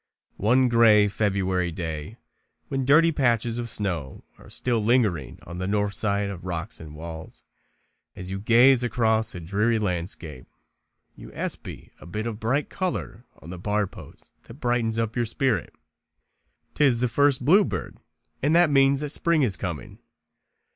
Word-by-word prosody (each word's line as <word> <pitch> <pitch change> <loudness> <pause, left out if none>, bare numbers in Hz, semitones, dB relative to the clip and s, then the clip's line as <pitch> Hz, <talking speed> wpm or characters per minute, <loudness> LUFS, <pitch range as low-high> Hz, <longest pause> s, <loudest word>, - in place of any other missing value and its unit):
One 125 +5 +3
gray 115 -3 +5
February 95 -4 0
day, 80 +3 -6 0.5
when 135 -1 -2
dirty 165 +5 +5
patches 120 -4 +1
of 120 -1 -4
snow 85 -12 -3 0.2
are - - -15
still 120 -3 0
lingering 105 - +1
on 85 +1 -8
the 95 - -3
north 105 0 0
side 100 -1 -1
of 90 -3 -9
rocks 90 +3 -4
and 75 -2 -10
walls, 80 0 -9 0.7
as 90 0 -7
you 95 - -3
gaze 120 +4 +5
across 110 -3 0
a - - -5
dreary 105 +7 0
landscape, 85 -8 -4 0.7
you - - -12
espy - - -6
a - - -13
bit 105 +5 -4
of 110 -2 -4
bright 130 +7 0
color 175 - -4 0.2
on 85 - -9
the 90 - -7
bar 105 +2 0
post - - -14
that 115 - -12
brightens 120 -4 -1
up 115 0 -1
your 120 -2 0
spirit. 130 0 -1 1.0
'Tis 130 -5 +3
the 125 - +3
first 135 +1 +2
bluebird, 145 - +2 0.4
and 150 +4 +2
that 170 -3 +5
means 135 0 +4
that 150 - -3
spring 160 +1 +1
is 105 -7 +1
coming. 85 -8 -6
110 Hz, 155 wpm, -25 LUFS, 95-125 Hz, 1.0 s, gray